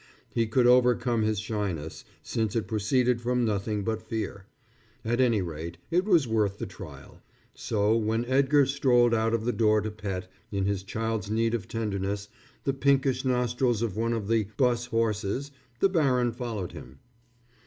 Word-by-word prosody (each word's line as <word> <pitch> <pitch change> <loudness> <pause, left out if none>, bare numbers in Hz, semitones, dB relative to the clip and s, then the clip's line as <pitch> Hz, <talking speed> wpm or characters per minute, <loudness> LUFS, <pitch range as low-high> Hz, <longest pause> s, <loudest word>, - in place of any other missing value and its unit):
He 115 -1 +1
could 120 +3 +2
overcome 125 -1 +4
his 110 0 +1
shyness, 100 -8 -4 0.2
since 110 -2 -2
it 115 - -1
proceeded 120 +3 +1
from 125 0 +1
nothing 105 -1 -1
but 110 +1 -2
fear. 110 -3 -5 0.6
At 120 +3 +1
any 115 -6 +3
rate, 85 0 -6
it 180 +3 +2
was 170 - +4
worth 105 -3 +1
the - - -4
trial. - - -11 0.3
So 105 0 +1
when 115 +1 0
Edgar 140 +2 +4
strolled 125 -3 +3
out 115 0 +2
of 115 -1 -3
the 120 - +2
door 110 -1 +3
to 110 +1 -3
pet, 100 -4 -5 0.2
in 100 -2 -1
his 100 -1 0
child's 110 +1 -3
need 115 +1 +1
of 110 -6 -2
tenderness, 100 -2 -3 0.3
the 135 - 0
pinkish 135 -1 +2
nostrils 125 -2 +1
of 110 -5 -2
one 115 +2 0
of 110 -3 -3
the 110 -2 +1
'bus 120 -2 +2
horses, 115 +3 -1 0.3
the - - +6
baron 130 -9 +2
followed 115 -6 -4
him. 65 +2 -11
115 Hz, 165 wpm, -27 LUFS, 105-125 Hz, 0.6 s, the